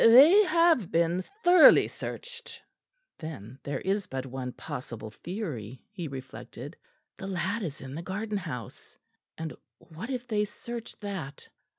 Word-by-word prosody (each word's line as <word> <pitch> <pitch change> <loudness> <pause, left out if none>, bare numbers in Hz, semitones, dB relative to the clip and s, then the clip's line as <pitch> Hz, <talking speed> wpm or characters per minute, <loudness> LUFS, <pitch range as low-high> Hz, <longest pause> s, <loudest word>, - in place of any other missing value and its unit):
"They 285 - +9
have 330 - +4
been 170 +2 +2 0.2
thoroughly 350 -2 +9
searched." 485 -1 -7 0.6
Then 135 - -7
there 140 - -3
is 200 +1 0
but 130 0 -4
one 130 -1 -4
possible 115 -4 -7
theory, 130 - -5
he 180 -6 -5
reflected. 135 +1 -8 0.4
The 190 - -6
lad 195 +4 -1
is 155 -6 -4
in 135 0 -7
the 160 - -4
garden 205 +4 -3
house. 150 - -7 0.4
And 160 -1 -4 0.2
what 175 +9 -9
if 250 -2 -3
they 210 -2 +2
search 235 +3 -7
that? 185 -9 -5
180 Hz, 140 wpm, -29 LUFS, 135-225 Hz, 0.6 s, They